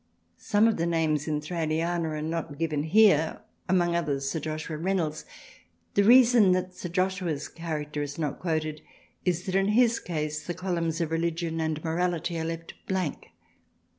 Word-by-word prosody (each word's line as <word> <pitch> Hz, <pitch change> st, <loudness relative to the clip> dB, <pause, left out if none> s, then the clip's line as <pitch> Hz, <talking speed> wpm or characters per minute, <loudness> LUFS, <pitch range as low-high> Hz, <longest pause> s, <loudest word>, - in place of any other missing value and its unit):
Some 210 Hz, +2 st, +3 dB
of 225 Hz, -, +1 dB
the 170 Hz, 0 st, 0 dB
names 160 Hz, -3 st, +1 dB
in 150 Hz, -1 st, -1 dB
Thraliana 165 Hz, +1 st, -1 dB
are 155 Hz, -1 st, -3 dB
not 160 Hz, -2 st, -3 dB
given 155 Hz, -2 st, -1 dB
here, 160 Hz, -4 st, +4 dB, 0.3 s
among 175 Hz, -2 st, +2 dB
others 140 Hz, -5 st, -1 dB
Sir 160 Hz, -, -1 dB
Joshua 155 Hz, +1 st, -4 dB
Reynolds. 170 Hz, -4 st, -1 dB, 0.7 s
The 200 Hz, -, +4 dB
reason 235 Hz, -3 st, +7 dB
that 185 Hz, 0 st, -1 dB
Sir 180 Hz, 0 st, -6 dB
Joshua's 185 Hz, -4 st, -1 dB
character 150 Hz, -3 st, -4 dB
is 145 Hz, 0 st, -5 dB
not 150 Hz, -4 st, -2 dB
quoted 155 Hz, -3 st, -2 dB, 0.4 s
is 180 Hz, 0 st, 0 dB
that 185 Hz, -, -3 dB
in 195 Hz, +1 st, +3 dB
his 230 Hz, +2 st, +3 dB
case 155 Hz, -3 st, -4 dB
the 175 Hz, -, -3 dB
columns 170 Hz, -3 st, -2 dB
of 165 Hz, -1 st, -1 dB
Religion 165 Hz, 0 st, -1 dB
and 160 Hz, -1 st, -2 dB
Morality 170 Hz, 0 st, -1 dB
are 160 Hz, -, -2 dB
left 165 Hz, 0 st, -5 dB
blank. 185 Hz, -6 st, -2 dB
165 Hz, 165 wpm, -27 LUFS, 155-180 Hz, 0.7 s, reason